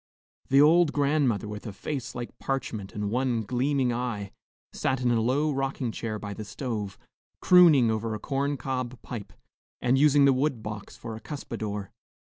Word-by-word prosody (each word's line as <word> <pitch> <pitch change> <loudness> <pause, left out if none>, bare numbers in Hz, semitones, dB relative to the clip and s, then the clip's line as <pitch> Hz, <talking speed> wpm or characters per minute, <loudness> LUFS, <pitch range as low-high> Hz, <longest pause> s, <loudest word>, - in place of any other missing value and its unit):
The 135 - +5
old 165 0 +5
grandmother, 140 -7 +1
with 105 +1 -7
a - - -4
face 120 +6 -5
like 120 -1 -6
parchment 115 -7 -3
and 105 -1 -2
one 125 -2 0
gleaming 130 +2 0
eye, 115 -5 -3 0.4
sat 130 0 0
in 125 -1 +1
a 115 -1 +2
low 140 +6 +1
rocking 135 -3 -2
chair 110 -1 -4
by 105 -1 -6
the 110 - -6
stove, 105 -3 -4 0.4
crooning 160 -10 +6
over 110 0 -2
a - - -6
corn 140 +4 -1
cob 130 0 -4
pipe 110 -5 -7 0.5
and 125 +2 +2
using 145 -1 +5
the 135 - +6
wood 130 -3 0
box 105 -1 -7
for 115 - -7
a 110 - -9
cuspadore. 110 - -5
125 Hz, 170 wpm, -27 LUFS, 110-140 Hz, 0.5 s, crooning